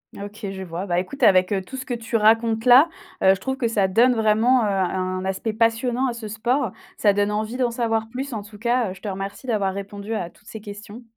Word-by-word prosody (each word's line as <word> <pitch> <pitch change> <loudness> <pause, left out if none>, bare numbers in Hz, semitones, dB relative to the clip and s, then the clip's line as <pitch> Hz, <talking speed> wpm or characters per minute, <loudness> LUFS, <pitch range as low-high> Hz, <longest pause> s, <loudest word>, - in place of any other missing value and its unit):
Ah 200 - -7
OK, 205 +1 -11
je 190 -1 -6
vois, 175 +2 -5
bah, 175 -2 0
écoute 275 +10 -10
avec, 185 0 +5
heu, 195 -2 +1
tout 225 +8 -10
ce 260 0 -6
que 250 - -3
tu 230 0 -4
racontes 225 +1 +3
là, 255 +6 +7 0.3
heu, 190 0 +6
je - - -11
trouve 265 0 -3
que 250 -5 0
ça 205 -4 +1
donne 240 +6 +4
vraiment, 225 +3 +3
heu, - - +1
un 185 -1 -1
aspect 190 +4 -2
passionnant 230 +3 +1
à 245 - -2
ce 230 -2 -7
sport, 235 +2 0 0.2
ça 205 - +3
donne 205 +1 +1
envie 215 +3 -2
d'en 245 -2 +1
savoir 225 -2 -1
plus 260 +4 -5
en 215 - -3
tout 210 +1 -13
cas, 235 -1 0
heu, - - -6
je 190 - -16
te 210 - -4
remercie 195 +6 -6
d'avoir 200 -4 0
répondu 200 +2 -6
à 180 -6 -3
toutes 210 - -25
ces 220 - -8
questions. 210 +2 -10
220 Hz, 255 wpm, -23 LUFS, 195-235 Hz, 0.3 s, là